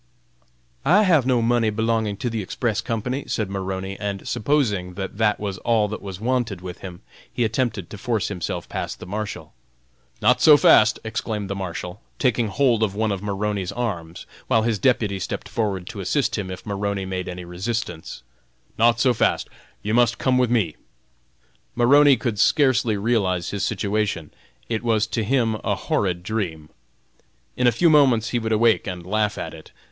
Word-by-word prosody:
"I 195 Hz, +8 st, +5 dB
have 160 Hz, -, +3 dB
no 125 Hz, -3 st, +2 dB
money 115 Hz, -1 st, +2 dB
belonging 110 Hz, -1 st, 0 dB
to 120 Hz, -, -2 dB
the 110 Hz, -1 st, -2 dB
Express 110 Hz, +3 st, -2 dB
Company!" 125 Hz, +4 st, -3 dB
said 105 Hz, -4 st, -2 dB
Maroney, 95 Hz, 0 st, -4 dB
and 100 Hz, -1 st, -4 dB
supposing 105 Hz, -9 st, 0 dB
that 95 Hz, +1 st, -6 dB
that 105 Hz, -2 st, +2 dB
was 100 Hz, -3 st, -4 dB
all 115 Hz, -3 st, +2 dB
that 105 Hz, -, -5 dB
was 95 Hz, -2 st, -7 dB
wanted 120 Hz, -4 st, -1 dB
with 90 Hz, 0 st, -8 dB
him, 90 Hz, -2 st, -9 dB, 0.3 s
he 120 Hz, -, -1 dB
attempted 110 Hz, -4 st, -1 dB
to 105 Hz, -, -8 dB
force 115 Hz, -1 st, -1 dB
himself 90 Hz, -5 st, -4 dB
past -, -, -5 dB
the -, -, -8 dB
Marshal. 105 Hz, +3 st, -5 dB, 0.7 s
"Not 120 Hz, +3 st, +3 dB
so 150 Hz, -2 st, +8 dB
fast!" 110 Hz, -5 st, +5 dB
exclaimed 105 Hz, -2 st, -3 dB
the -, -, -2 dB
Marshal, 90 Hz, +1 st, -5 dB, 0.2 s
taking 120 Hz, -3 st, +1 dB
hold 115 Hz, +2 st, +2 dB
of 100 Hz, -3 st, 0 dB
one 110 Hz, 0 st, 0 dB
of 95 Hz, -2 st, -3 dB
Maroney's 100 Hz, -2 st, -2 dB
arms, 90 Hz, -9 st, -4 dB, 0.2 s
while 110 Hz, -, +3 dB
his 110 Hz, -3 st, 0 dB
deputy 105 Hz, -7 st, +1 dB
stepped 95 Hz, -, -4 dB
forward 100 Hz, -3 st, -2 dB
to 110 Hz, -3 st, -7 dB
assist 125 Hz, +8 st, 0 dB
him, 100 Hz, -4 st, -4 dB
if 90 Hz, -1 st, -8 dB
Maroney 100 Hz, -1 st, -2 dB
made 95 Hz, -1 st, -4 dB
any 90 Hz, 0 st, -7 dB
resistance. 90 Hz, -, -4 dB, 0.6 s
"Not 115 Hz, 0 st, +4 dB
so 125 Hz, +1 st, +4 dB
fast, 110 Hz, -, +1 dB, 0.3 s
you 105 Hz, -, -1 dB
must 120 Hz, 0 st, +3 dB
come 130 Hz, -1 st, +2 dB
with 125 Hz, -2 st, +2 dB
me!" 105 Hz, -10 st, +1 dB, 1.0 s
Maroney 140 Hz, +3 st, +6 dB
could 110 Hz, -2 st, -3 dB
scarcely 120 Hz, -7 st, +3 dB
realize 100 Hz, -6 st, 0 dB
his 100 Hz, 0 st, -3 dB
situation; 100 Hz, -6 st, -1 dB, 0.4 s
it 110 Hz, -2 st, -2 dB
was 110 Hz, -2 st, +2 dB
to 110 Hz, 0 st, -2 dB
him 115 Hz, -1 st, +1 dB
a -, -, 0 dB
horrid 90 Hz, -3 st, -1 dB
dream. 85 Hz, -7 st, -3 dB, 0.9 s
In 125 Hz, -, +2 dB
a -, -, +6 dB
few 165 Hz, +9 st, +3 dB
moments 130 Hz, -7 st, +4 dB
he 120 Hz, -, 0 dB
would 110 Hz, -1 st, -3 dB
awake 110 Hz, 0 st, +3 dB
and 90 Hz, -2 st, -5 dB
laugh 105 Hz, +2 st, 0 dB
at -, -, -5 dB
it. -, -, -13 dB
110 Hz, 175 wpm, -23 LUFS, 95-120 Hz, 1.0 s, so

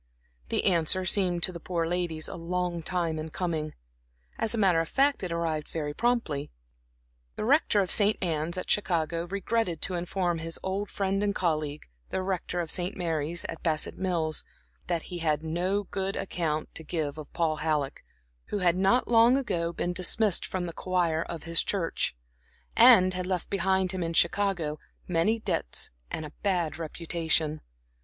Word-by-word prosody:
The -, -, 0 dB
answer 185 Hz, 0 st, +3 dB
seemed 180 Hz, -3 st, +2 dB
to 185 Hz, -, +6 dB
the 170 Hz, -, -7 dB
poor 170 Hz, 0 st, -2 dB
ladies 170 Hz, -2 st, -1 dB
a -, -, -5 dB
long 175 Hz, 0 st, -2 dB
time 165 Hz, -2 st, -1 dB
in 155 Hz, +1 st, -5 dB
coming; 160 Hz, -3 st, -3 dB, 0.6 s
as 225 Hz, +1 st, +1 dB
a -, -, -2 dB
matter 190 Hz, -6 st, +4 dB
of 165 Hz, -, -1 dB
fact, 280 Hz, +1 st, +2 dB
it 180 Hz, -3 st, -3 dB
arrived 165 Hz, -3 st, -1 dB
very 150 Hz, -2 st, -4 dB
promptly. 230 Hz, -11 st, 0 dB, 0.9 s
The -, -, -3 dB
Rector 260 Hz, -5 st, +4 dB
of 185 Hz, -, 0 dB
St. 210 Hz, 0 st, +4 dB
Anne's 165 Hz, 0 st, -1 dB
at 185 Hz, -, -4 dB
Chicago 170 Hz, -4 st, +1 dB
regretted 200 Hz, -2 st, -1 dB
to 185 Hz, -, 0 dB
inform 175 Hz, -1 st, -1 dB
his 165 Hz, 0 st, -2 dB
old 195 Hz, +2 st, -2 dB
friend 195 Hz, 0 st, -1 dB
and 205 Hz, 0 st, 0 dB
colleague 155 Hz, -4 st, -1 dB, 0.3 s
the 185 Hz, -, -2 dB
Rector 185 Hz, -2 st, -2 dB
of 165 Hz, -, -4 dB
St. 180 Hz, +1 st, -2 dB
Mary's, 165 Hz, -1 st, -1 dB
at 165 Hz, -, -6 dB
Bassett 155 Hz, -2 st, 0 dB
Mills, 170 Hz, -4 st, 0 dB, 0.4 s
that 170 Hz, -2 st, -1 dB
he 175 Hz, -2 st, -6 dB
had 155 Hz, -2 st, 0 dB
no 180 Hz, +5 st, 0 dB
good 195 Hz, 0 st, -3 dB
account 155 Hz, -5 st, -2 dB
to 165 Hz, -, -5 dB
give 155 Hz, -2 st, -3 dB
of 150 Hz, -, -9 dB
Paul 160 Hz, -2 st, 0 dB
Halleck, 150 Hz, -3 st, -1 dB, 0.4 s
who -, -, -3 dB
had 180 Hz, -2 st, +2 dB
not 195 Hz, +7 st, +3 dB
long 235 Hz, +2 st, +6 dB
ago 175 Hz, -11 st, -1 dB
been 175 Hz, +1 st, -2 dB
dismissed 185 Hz, +2 st, +3 dB
from 185 Hz, -1 st, -3 dB
the 170 Hz, -, -5 dB
choir 175 Hz, -3 st, 0 dB
of 165 Hz, -1 st, -6 dB
his 165 Hz, -1 st, +1 dB
church, 175 Hz, -, -1 dB, 0.6 s
and 185 Hz, 0 st, +7 dB
had 180 Hz, 0 st, -3 dB
left 185 Hz, -2 st, -2 dB
behind 190 Hz, -1 st, +1 dB
him 185 Hz, -1 st, -3 dB
in 165 Hz, 0 st, -2 dB
Chicago 170 Hz, -3 st, +2 dB, 0.3 s
many 185 Hz, +6 st, +2 dB
debts -, -, -1 dB, 0.2 s
and 160 Hz, -, -4 dB
a 150 Hz, -, -9 dB
bad 175 Hz, -6 st, 0 dB
reputation. 160 Hz, -1 st, -1 dB
175 Hz, 175 wpm, -28 LUFS, 160-190 Hz, 0.9 s, and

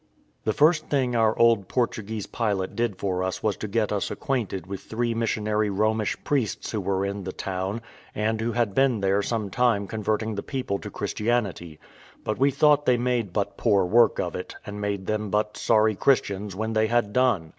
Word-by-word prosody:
The 110 Hz, -, +2 dB
first 155 Hz, +1 st, +3 dB
thing 130 Hz, -4 st, 0 dB
our 110 Hz, -1 st, +3 dB
old 115 Hz, -5 st, +4 dB
Portuguese 110 Hz, -4 st, -2 dB
pilot 100 Hz, -5 st, -2 dB
did 115 Hz, -5 st, -1 dB
for 90 Hz, -1 st, -1 dB
us 95 Hz, -1 st, -3 dB
was 105 Hz, -2 st, +1 dB
to 110 Hz, -, -5 dB
get 105 Hz, +1 st, 0 dB
us 100 Hz, -2 st, -1 dB
acquainted 115 Hz, -8 st, -2 dB
with 95 Hz, 0 st, -6 dB
three 120 Hz, +1 st, -2 dB
missionary 110 Hz, -2 st, 0 dB
Romish 110 Hz, +2 st, 0 dB
priests 130 Hz, -8 st, -1 dB
who 110 Hz, -, -2 dB
were 95 Hz, 0 st, 0 dB
in 100 Hz, 0 st, -4 dB
the 95 Hz, -, -4 dB
town, 95 Hz, +5 st, -4 dB, 0.3 s
and 110 Hz, +1 st, 0 dB
who 115 Hz, +1 st, -1 dB
had 115 Hz, -4 st, 0 dB
been 130 Hz, -4 st, +2 dB
there 100 Hz, +1 st, +2 dB
some 105 Hz, -2 st, -2 dB
time 115 Hz, -4 st, +2 dB
converting 110 Hz, +1 st, -2 dB
the 100 Hz, -, -3 dB
people 125 Hz, -7 st, -3 dB
to -, -, -7 dB
Christianity; 105 Hz, -8 st, -2 dB, 0.5 s
but 110 Hz, -, -2 dB
we 135 Hz, +2 st, +5 dB
thought 145 Hz, +1 st, +3 dB
they 125 Hz, -1 st, +5 dB
made 120 Hz, -5 st, 0 dB
but 100 Hz, +2 st, -2 dB
poor 100 Hz, -5 st, +3 dB
work 115 Hz, +6 st, +4 dB
of -, -, -2 dB
it, -, -, -6 dB
and 105 Hz, 0 st, -6 dB
made 100 Hz, -2 st, -2 dB
them 105 Hz, 0 st, -2 dB
but 105 Hz, +1 st, 0 dB
sorry 110 Hz, -1 st, +3 dB
Christians 100 Hz, -5 st, +1 dB
when 110 Hz, +2 st, -2 dB
they 110 Hz, 0 st, +2 dB
had 115 Hz, -3 st, +1 dB
done. 125 Hz, -11 st, +2 dB
110 Hz, 195 wpm, -25 LUFS, 100-120 Hz, 0.5 s, we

